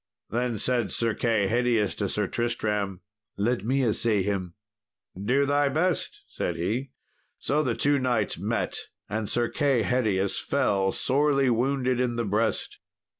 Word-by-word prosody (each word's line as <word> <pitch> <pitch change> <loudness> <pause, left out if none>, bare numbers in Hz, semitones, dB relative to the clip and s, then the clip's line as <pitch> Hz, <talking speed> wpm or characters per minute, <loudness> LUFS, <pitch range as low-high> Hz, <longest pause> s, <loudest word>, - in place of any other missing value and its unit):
Then 120 0 -1
said 120 0 0
Sir 115 -1 +1
Kay 110 -3 +1
Hedius 115 -2 +1
to 100 -2 -1
Sir 105 +2 0
Tristram, 105 -4 -2 0.4
"Let 110 +1 0
me 130 +4 +1
assay 110 -2 +1
him." 95 -3 -2 0.6
"Do 125 +9 +1
thy 145 0 +2
best," 160 +5 -1
said 85 - -3
he. 115 +11 -2 0.5
So 150 +2 0
the 125 -6 0
two 145 -1 +2
knights 120 -6 0
met, - - -1 0.3
and 110 +1 -3
Sir 120 -1 +2
Kay 135 -5 +1
Hedius 105 -6 0
fell 95 -1 +1
sorely 140 +1 +2
wounded 130 +1 +1
in 120 -2 0
the 115 0 -1
breast. 105 +3 -1
120 Hz, 145 wpm, -26 LUFS, 105-130 Hz, 0.6 s, thy